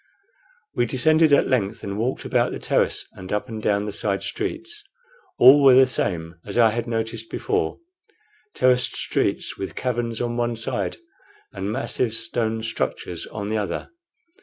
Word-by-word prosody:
We 120 0 +1
descended 155 +6 +3
at 140 - +5
length 110 -5 0
and 100 0 -4
walked 115 +5 -2
about - - +1
the - - -4
terrace - - +1
and 95 0 -10
up 105 +4 -1
and 110 -3 -6
down 100 -1 +1
the 105 - -3
side 100 -1 -1
streets. 360 +1 -4 0.5
All 135 +4 +8
were 135 -2 +7
the 130 0 +8
same 85 -9 -3
as 100 - -6
I 115 -2 +6
had 120 +2 -3
noticed 115 0 -3
before 425 0 -1 0.8
terraced 125 -1 +2
streets, - - -1
with 95 - -5
caverns 120 -2 -2
on 120 0 -2
one 120 0 0
side 115 0 -3 0.6
and 100 +1 -3
massive 120 -1 -1
stone 110 -1 -2
structures 110 -12 -3
on 105 -1 -5
the 110 0 0
other. 100 - -4
115 Hz, 160 wpm, -23 LUFS, 105-130 Hz, 0.8 s, All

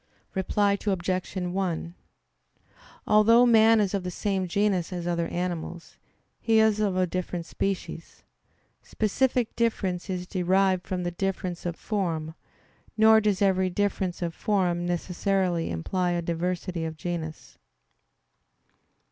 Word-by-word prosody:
Reply 200 +1 +1
Obj. 185 -2 -1
1: 180 -2 -2 1.1
Although 225 +3 +6
man 225 -1 +6
is 205 -2 +1
of 195 -2 -1
the 180 - -3
same 190 0 -2
genus 195 -1 0
as 175 -2 -4
other 170 -1 0
animals, 175 -1 -5 0.4
he 225 -1 +2
is 220 -1 +3
of 200 -3 0
a 185 - +3
different 175 -1 -4
species. 185 -3 -4 0.6
Specific 240 +2 0
difference 200 -6 -1
is 180 -1 -3
derived 185 0 +1
from 185 -1 -2
the 175 - -2
difference 180 -1 -3
of 170 - -3
form; 165 -8 -2 0.6
nor 220 0 +6
does 205 -1 +1
every 190 -1 +2
difference 190 -2 -1
of 170 -1 -2
form 180 -5 0
necessarily 180 0 0
imply 175 - -1
a 175 - -1
diversity 175 +1 -2
of 160 -1 -5
genus. 160 -2 -6
185 Hz, 125 wpm, -26 LUFS, 175-205 Hz, 1.1 s, Although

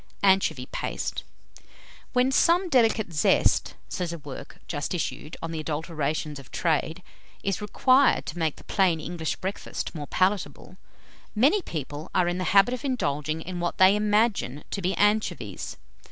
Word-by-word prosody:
ANCHOVY 190 -9 +3
PASTE. - - -3 0.9
"When 250 +1 +3
some 345 +6 +3
delicate 225 - +2
zest," 150 - +2
says 175 -2 -3
a 170 - -5
work 145 -4 -9
just 150 +3 -3
issued 160 -2 -4
on 165 - -3
the 160 - -4
adulterations 155 -1 -3
of 135 - -14
trade, 165 +2 -1 0.4
"is 195 +1 -1
required 255 +6 +3
to 170 - -6
make 160 -2 0
the - - -15
plain 185 -5 +2
English 160 0 -3
breakfast 190 +2 -5
more 150 -4 -6
palatable, 190 +1 -1 0.6
many 285 - +4
people 150 - -6
are 180 -2 +3
in 175 +1 -1
the 185 - -1
habit 200 +5 +6
of 255 - -5
indulging 155 - -1
in 180 0 -5
what 175 0 -2
they 190 +2 +6
imagine 210 - +1
to 200 - -3
be 185 +1 0
anchovies. 205 - 0
180 Hz, 155 wpm, -26 LUFS, 155-210 Hz, 0.9 s, habit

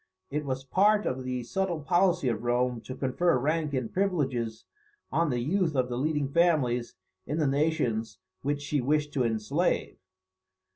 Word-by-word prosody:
It 150 +1 -2
was 130 -1 -3
part 205 +9 +3
of 130 0 -2
the 125 -1 -3
subtle 180 +5 -1
policy 175 +1 +2
of 115 -3 0
Rome 120 0 +1
to 130 - -6
confer 135 +5 +1
rank 150 +2 0
and 125 -4 -3
privileges 135 - -1 0.5
on 165 0 +2
the 125 - 0
youth 165 +3 +1
of 125 -1 +1
the 120 - -2
leading 150 0 0
families 135 -7 +2 0.3
in 150 - -2
the 155 - +2
nations 135 - 0 0.2
which 145 +1 -1
she 145 -1 0
wished 150 +3 0
to 130 - +1
enslave. 110 -2 0
140 Hz, 160 wpm, -28 LUFS, 125-160 Hz, 0.5 s, part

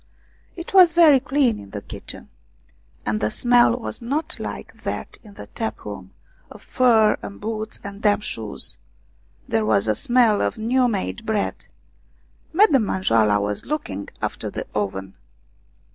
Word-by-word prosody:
It 340 +1 -8
was 365 -3 +7
very 320 -5 +7
clean 260 -3 +1
in 100 - -12
the 105 0 -6
kitchen, - - -9 0.8
and 105 0 0
the 105 - +1
smell 240 - +3
was 245 - -5
not 295 +8 -3
like - - -7
that - - -5
in 205 -3 -15
the - - -9
tap 110 +1 -5
room, 100 -3 -7 0.4
of - - -13
fur 225 -5 +3
and 200 - -8
boots 215 0 -4
and 200 0 -8
damp 210 -1 +2
shoes; 105 - -3 0.7
there 110 -1 +1
was 105 -1 +2
a 110 - +3
smell 235 - +3
of - - -1
new 245 +3 +2
made 225 +1 -3
bread. 220 -2 -2 0.8
Madame 315 - +4
Manjoala 110 - +2
was 105 0 -3
looking 100 - -4
after - - -3
the - - -5
oven. 95 -2 -3
215 Hz, 150 wpm, -22 LUFS, -, 0.8 s, was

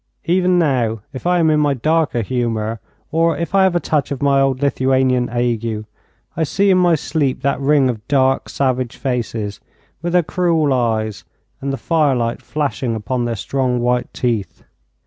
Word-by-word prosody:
Even 180 +2 +2
now 125 -9 +1
if 130 +6 -5
I 180 0 +3
am 160 -2 +3
in 150 - +3
my 145 -2 +2
darker 155 -2 +1
humour, 115 -2 -2 0.3
or 165 +1 +2
if 170 +2 -4
I 195 -1 +5
have 185 -2 +1
a - - +3
touch 150 -4 -1
of 140 - -4
my 140 -1 +3
old 135 -1 +1
Lithuanian 130 -2 +1
ague, 115 -2 -1 0.5
I 165 - 0
see 195 +6 +2
in 185 - +4
my 175 -2 +4
sleep 145 -3 -1
that 140 -1 +1
ring 140 -1 +3
of 115 -3 -4
dark, 135 -2 +2
savage 130 -3 -1
faces, 115 -5 -3 0.4
with 175 +1 -3
their 180 -1 +4
cruel 165 -4 +1
eyes, 110 -4 -1 0.4
and 135 0 -2
the 135 - -2
firelight 135 -9 0
flashing 140 -5 -2
upon 120 +3 -2
their 120 -1 -2
strong 125 +4 -1
white 125 0 0
teeth. 105 -9 -2
130 Hz, 175 wpm, -18 LUFS, 120-155 Hz, 0.5 s, I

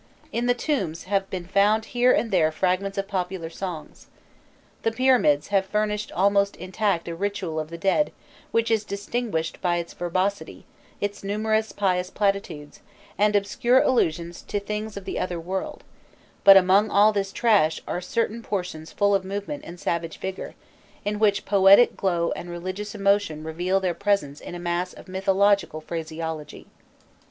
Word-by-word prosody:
In 240 +1 -1
the 245 - +3
tombs 215 - -2
have 195 0 -1
been 180 -2 -5
found 205 +4 +2
here 245 +1 +4
and 230 - +1
there 160 -4 +3
fragments 185 +4 -1
of 195 0 -2
popular 180 -4 -3
songs. 175 -3 -7 0.7
The 225 - +1
pyramids 230 - +3
have 195 -1 +3
furnished 210 +1 -1
almost 200 +2 +2
intact 185 -1 -1
a 170 - -3
ritual 185 -3 -3
of 155 0 -5
the 170 - -7
dead 195 - +1 0.4
which 230 0 +1
is 220 -2 +2
distinguished 200 -4 -3
by 175 -2 +1
its 170 -1 -5
verbosity, 185 +3 -2 0.3
its 205 0 -3
numerous 215 +2 0
pious 185 -2 0
platitudes, 195 -8 -2 0.3
and 210 +1 +2
obscure 235 +5 +3
allusions 170 -9 0
to 205 - -3
things 210 +1 -5
of 195 - -8
the - - -3
other 175 -2 -2
world; 185 +3 -5 0.6
but, 195 -1 +10
among 195 +3 +4
all 210 +2 +5
this 195 -1 -1
trash, 200 -9 +3
are 180 - -3
certain 230 +4 -2
portions 180 -7 -4
full 205 0 +2
of 195 -1 +2
movement 205 +9 -5
and 175 +1 -10
savage 170 -1 -2
vigour, 190 0 -6 0.5
in 205 0 -1
which 205 -2 +2
poetic 200 +3 +6
glow 170 -3 0
and 175 - -5
religious 185 +4 -5
emotion 200 -6 +1
reveal 175 +4 0
their 185 -2 -1
presence 200 -8 -1
in - - -8
a - - -6
mass 175 +1 -2
of - - -14
mythological 195 -2 +2
phraseology. 160 -1 -6
195 Hz, 160 wpm, -24 LUFS, 175-205 Hz, 0.7 s, but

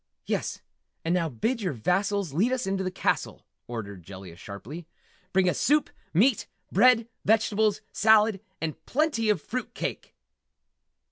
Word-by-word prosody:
"Yes - - -2 0.4
and 165 - +2
now 170 -3 +1
bid 225 - -1
your 185 -6 -1
vassals 180 - 0
lead 205 - +2
us 255 -1 0
into 195 0 -1
the 185 - -1
castle!" 185 - -1 0.2
ordered 100 -5 -6
Jellia 95 -1 -10
sharply. 120 - -9 0.4
"Bring 190 -1 +3
us 180 - +1
soup, 300 +1 +3 0.2
meat, 220 - +3 0.2
bread, 230 +2 +5 0.2
vegetables, 215 -1 +2
salad 215 -2 +4 0.2
and 160 -2 -4
plenty 270 -6 +1
of 210 - +3
fruit 255 +1 -3
and - - -36
cake!" - - -4
195 Hz, 145 wpm, -27 LUFS, 155-225 Hz, 0.4 s, bread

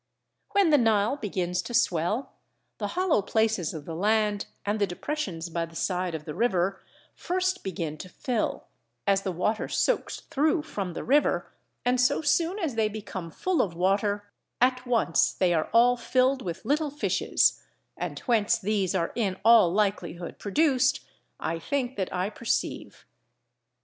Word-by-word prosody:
When 395 -5 +4
the 295 - +6
Nile 225 +1 +3
begins 180 -7 -2
to 240 - -5
swell, 200 - +1 0.5
the - - -1
hollow 365 - +3
places 220 -4 0
of 155 -3 -8
the 165 - -6
land 210 +3 +1 0.2
and 205 +2 0
the 200 - +2
depressions 180 - -4
by 165 0 -2
the 165 - -16
side 180 -1 -1
of 155 -1 -7
the 150 - -5
river 195 -4 0 0.3
first 370 +1 -1
begin 165 -6 -4
to 185 - -8
fill, 240 +3 -2 0.4
as 195 -1 +3
the 190 - -2
water 185 +5 -1
soaks - - 0
through 305 +3 +1
from 200 - -4
the - - -5
river, 290 +4 +2 0.3
and 250 0 +3
so 250 - +3
soon 335 +5 +2
as 330 - -2
they 220 -1 +1
become 200 -5 -6
full 365 - 0
of 175 -5 -2
water, 200 +3 +1 0.3
at 255 0 +2
once 230 -9 +2
they 180 -2 +2
are 160 -2 0
all 245 +2 +5
filled 255 +3 +2
with 170 -6 -6
little 300 +1 +1
fishes; 295 +2 +1 0.3
and - - -4
whence 230 -2 +2
these 200 -3 0
are 170 -2 0
in 195 -6 -1
all 225 -7 +7
likelihood 180 -4 -2
produced, 265 +5 +2 0.4
I 165 +1 -2
think 265 - -2
that 190 -2 -2
I 185 +3 -1
perceive. 230 - -3
210 Hz, 160 wpm, -27 LUFS, 180-255 Hz, 0.5 s, all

